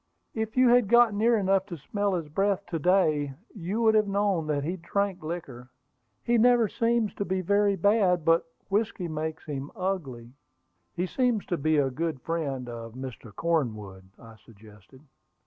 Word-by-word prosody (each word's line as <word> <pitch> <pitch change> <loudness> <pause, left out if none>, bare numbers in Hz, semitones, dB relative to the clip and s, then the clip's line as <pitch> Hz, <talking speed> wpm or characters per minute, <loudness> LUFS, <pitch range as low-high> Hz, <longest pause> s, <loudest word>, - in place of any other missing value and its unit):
"If 220 +1 -4
you 255 -1 +6
had 245 -3 +5
got 235 0 +5
near 225 +3 +3
enough 195 -1 +1
to 175 -4 -7
smell 200 +6 -2
his 165 -3 -3
breath 195 +5 0
to 165 - -1
day, 155 -5 +2 0.2
you 205 +4 -3
would 220 -1 +5
have 215 -1 +3
known 195 -5 0
that 145 -2 -1
he 175 +5 -3
drank 190 +2 -2
liquor. 140 -7 -7 0.5
He 235 0 +2
never 240 -1 +5
seems 230 0 0
to - - -3
be 190 -1 -1
very 200 +2 +2
bad, 190 -3 +2
but 165 0 +3 0.2
whiskey 205 -3 -1
makes 155 0 -4
him 140 -2 -5
ugly." 140 -12 -4 0.6
"He 180 +1 -1
seems 240 +1 0
to 175 - -1
be 155 +1 +1
a 135 -2 +2
good 160 +1 -3
friend 140 -7 -3
of 115 -1 -8
Mr. 125 -3 -8
Cornwood," 110 - -2
I 115 -1 -14
suggested. 105 +3 -18
175 Hz, 170 wpm, -27 LUFS, 140-205 Hz, 0.6 s, you